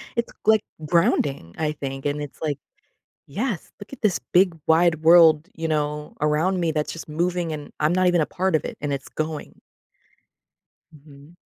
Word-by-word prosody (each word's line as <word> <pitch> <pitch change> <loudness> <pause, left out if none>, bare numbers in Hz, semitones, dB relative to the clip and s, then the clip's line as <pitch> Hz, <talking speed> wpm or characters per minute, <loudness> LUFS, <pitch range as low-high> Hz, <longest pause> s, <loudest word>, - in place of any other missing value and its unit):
It's, 235 - -2
like, 220 -1 +4 0.2
grounding, 145 - +1
I 155 -1 0
think, 135 -2 -6
and 145 +1 -1
it's 145 +1 -9
like, 150 -3 -2 0.7
"Yes, 205 - -4
look 205 +6 -11
at - - -9
this 200 -4 +2
big, 180 -1 +4
wide 160 -1 +3
world," 165 0 +6
you 165 0 -3
know, 150 -1 -2
"around 160 +5 +1
me 165 -2 +1
that's 150 -1 -2
just 165 - -9
moving, 170 +1 -1
and 150 -1 -7
I'm 155 +3 +2
not 185 0 +3
even 175 -2 +3
a - - -1
part 185 -1 -1
of - - -4
it, - - -7
and 145 -1 -1
it's 140 -1 -4
going." 155 -1 -5 1.3
Mhm. 145 +2 -17
160 Hz, 175 wpm, -23 LUFS, 150-175 Hz, 1.3 s, world